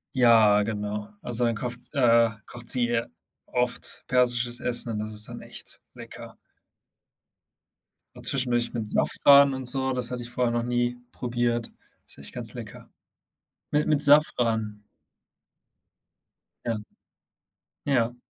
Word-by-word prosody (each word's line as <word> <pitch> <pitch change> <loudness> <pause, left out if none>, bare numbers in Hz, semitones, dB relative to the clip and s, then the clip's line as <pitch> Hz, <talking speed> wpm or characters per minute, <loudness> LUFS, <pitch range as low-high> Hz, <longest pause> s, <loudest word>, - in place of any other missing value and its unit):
Ja, 110 -4 +4
genau. 105 -1 -5
Also, 120 0 -1
dann 115 - -1
kofft 125 +5 -5
äh, 115 -4 +3 0.2
kocht 120 -1 -8
sie 120 -2 +2
ja 115 -1 -1 0.4
oft 125 0 0
persisches 120 -1 +1
Essen 120 -1 -1
und 105 - -4
das 110 0 -6
ist 105 0 -3
dann - - -10
echt - - -7
lecker. - - -12 1.8
A - - -13
zwischendurch 125 -3 +3
mit 110 -3 -4
Safran 140 +3 +5
und 130 -2 -3
so, 130 0 +2
das 125 -1 -2
hatte 125 -1 -6
ich 120 - -6
vorher 125 -1 -1
noch 120 0 -2
nie 120 0 -2
probiert, 120 -1 -3 0.4
ist - - -10
echt - - -9
ganz - - -5
lecker. - - -11 0.8
Mi 150 0 +1
mit 150 -2 +4
Safran. 115 -8 +3 1.8
Ja, 115 -2 -2 1.1
ja. 120 -4 0
120 Hz, 130 wpm, -25 LUFS, 115-125 Hz, 1.8 s, Safran